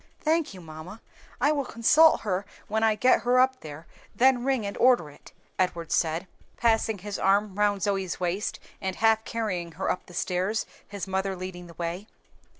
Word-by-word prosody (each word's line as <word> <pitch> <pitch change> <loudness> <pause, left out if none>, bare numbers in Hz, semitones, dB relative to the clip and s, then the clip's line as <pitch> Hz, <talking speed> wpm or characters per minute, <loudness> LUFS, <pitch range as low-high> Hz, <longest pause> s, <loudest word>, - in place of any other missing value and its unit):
"Thank 315 -7 0
you, 185 - -10
mamma; 160 +6 -10 0.4
I 285 +4 +3
will 290 -2 0
consult 305 +7 +4
her 195 -2 -1 0.2
when 220 +1 -1
I 220 -1 +4
get 250 +4 +4
her 250 +1 +3
up 260 0 +3
there, 155 +1 -9 0.3
then 255 -1 +4
ring 260 -5 0
and 200 - -4
order 240 - +4
it," - - -17 0.3
Edward 170 -3 -1
said, 165 +2 +1 0.3
putting 225 -2 +2
his 200 +2 -6
arm 200 +1 +2
round 205 -1 +1
Zoe's 195 -3 -1
waist 180 +3 -2 0.2
and 190 -1 -2
half 220 0 +3
carrying 185 -7 -3
her 185 - -1
up - - -5
the 175 - -12
stairs, 185 +5 -1 0.2
his 200 -2 -5
mother 190 0 -2
leading 180 -1 -7
the 170 - -14
way. 175 +5 -4
200 Hz, 180 wpm, -27 LUFS, 180-230 Hz, 0.4 s, consult